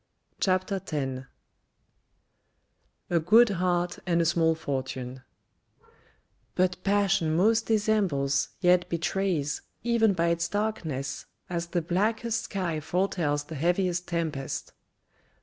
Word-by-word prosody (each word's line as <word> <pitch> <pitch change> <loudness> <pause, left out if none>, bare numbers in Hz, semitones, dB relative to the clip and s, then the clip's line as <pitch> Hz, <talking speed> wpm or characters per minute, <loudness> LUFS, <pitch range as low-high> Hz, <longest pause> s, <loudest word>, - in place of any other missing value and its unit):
CHAPTER 185 0 +1
X 135 -7 -3 1.9
A 170 - +4
GREAT 220 +8 +6
HEART 180 -2 0
AND 170 -1 +2
A 170 - +2
SMALL 165 -1 +3
FORTUNE 130 -4 -4 1.3
But 180 0 +1
passion 195 -5 +2
most 220 +6 +3
disembles, 195 - +1
yet 180 -1 +4
betrays, 170 -3 -1 0.2
Even 230 -3 +3
by 170 -2 +1
its 170 0 0
darkness, 160 -11 -3 0.2
as 170 -1 -2
the 170 -1 -1
blackest 220 +6 0
sky 175 -5 -2
Foretells 160 -3 0
the 155 - -10
heaviest 175 +3 0
tempest. 160 -5 -3
175 Hz, 105 wpm, -27 LUFS, 155-195 Hz, 1.9 s, GREAT